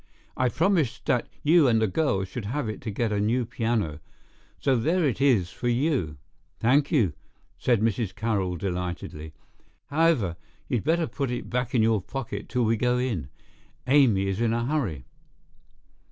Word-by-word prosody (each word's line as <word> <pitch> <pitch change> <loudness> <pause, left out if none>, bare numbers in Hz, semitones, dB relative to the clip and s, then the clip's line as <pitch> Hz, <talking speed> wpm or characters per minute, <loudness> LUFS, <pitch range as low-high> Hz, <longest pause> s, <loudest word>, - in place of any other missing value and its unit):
I 130 -1 +1
promised 160 - +1
that 120 - +1 0.2
you 155 -1 +5
and 115 -2 +3
the 110 - +3
girls 100 -4 0
should 115 +1 -6
have 125 +3 -2
it 110 - -5
to 110 - -5
get 110 +2 -1
a 105 - 0
new 115 +4 +1
piano, 110 -9 -1 0.6
so 135 - +2
there 160 +8 +2
it 130 0 -2
is 110 -11 +3
for 120 - -4
you." 120 - 0 0.4
"Thank 140 +6 +3
you," 110 - +3 0.5
said 120 -4 +2
Mrs. 110 -2 0
Carroll 100 -5 -1
delightedly. 90 -4 -5 0.6
"However, 145 - +2 0.3
you'd 120 - -1
better 165 +1 +2
put 140 -4 -3
it 120 0 -4
back 125 +1 -1
in 115 - +4
your 110 -2 +2
pocket 135 +5 -6
till 125 -2 0
we 115 +1 +2
go 125 +2 +1
in. 110 - -2 0.6
Amy 125 -8 +4
is 95 +2 -2
in 115 -1 +2
a 115 0 0
hurry." 115 - -2
120 Hz, 170 wpm, -26 LUFS, 100-135 Hz, 0.6 s, you